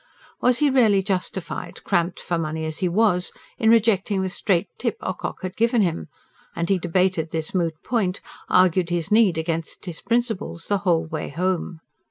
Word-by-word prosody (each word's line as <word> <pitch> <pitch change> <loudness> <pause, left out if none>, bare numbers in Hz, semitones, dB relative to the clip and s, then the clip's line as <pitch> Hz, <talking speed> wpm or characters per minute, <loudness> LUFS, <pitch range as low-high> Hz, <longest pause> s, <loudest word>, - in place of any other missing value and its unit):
Was 250 0 +4
he 290 +1 +3
really 215 -7 +4
justified, 185 -1 -4
cramped 175 +1 0
for 170 -2 -2
money 160 0 -3
as 155 -1 -4
he 185 - +1
was, 180 -2 +2 0.3
in 220 - +3
rejecting 210 -3 +3
the 190 - -2
straight 190 0 +1
tip 235 -4 -1
Ocock 185 - -4
had 185 0 -4
given 230 -1 +3
him? 160 - -2 0.5
And 170 0 -2
he 195 -2 +3
debated 175 -1 +1
this 160 -1 -3
moot 170 -4 0
point 200 -7 0 0.3
argued 180 -1 +4
his 175 +2 -2
need 210 -6 +5
against 165 0 -3
his 175 -3 -6
principles 230 -8 -1
the 205 -1 0
whole 170 -4 +1
way 155 -1 -4
home. 175 0 -2
185 Hz, 175 wpm, -23 LUFS, 165-205 Hz, 0.5 s, need